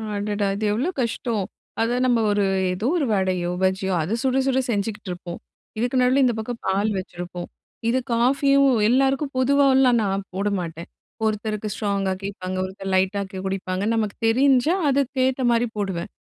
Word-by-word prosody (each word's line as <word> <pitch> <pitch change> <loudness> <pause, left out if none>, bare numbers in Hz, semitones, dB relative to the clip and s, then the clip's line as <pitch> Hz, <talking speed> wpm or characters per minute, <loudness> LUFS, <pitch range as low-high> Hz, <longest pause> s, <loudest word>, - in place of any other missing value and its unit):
அடடா! 205 0 -1
இது 215 +1 -2
எவ்ளோ 265 +11 0
கஷ்டம். 230 -3 -2 0.4
அத 235 +2 +1
நம்ப 240 -2 +3
ஒரு 205 -1 +2 0.3
ஏதோ 210 +7 -2
ஒரு 295 - +1
வடையோ, 185 -2 0
பஜ்ஜியோ 190 0 +1
அத 195 +9 -1
சுட 260 0 +1
சுட 265 -1 +2
செஞ்சுக்கிட்டுருப்போம். 200 -4 -4 0.4
இதுக்கு 245 +3 0
நடுவுல 255 +2 +3
இந்த 245 - +2
பக்கம் 230 +2 -5
பால் 200 +3 +1
வச்சிருப்போம். 175 -1 -7 0.4
இது 255 +2 +2
காஃபியும் 275 +3 +3 0.2
எல்லாருக்கும் 270 +3 +2
பொதுவால்லாம் 265 -2 +4
நான் 195 0 -1
போடமாட்டேன். 180 -4 -3 0.4
ஒருத்தருக்கு 215 0 -2
ஸ்ட்ராங்கா 200 -2 -1
கேட்பாங்க. 185 -2 -5
ஒருத்தர் 190 0 -6
லைட்டா 190 +2 +1
கே 190 - -6
குடிப்பாங்க. 190 0 -2
நமக்கு 215 -3 -1
தெரிஞ்சா 265 +6 +3
அதுக்கேத்த 265 -1 +1
மாரி 235 +1 +2
போடுவேன். 190 -4 -3
215 Hz, 145 wpm, -23 LUFS, 190-255 Hz, 0.4 s, பொதுவால்லாம்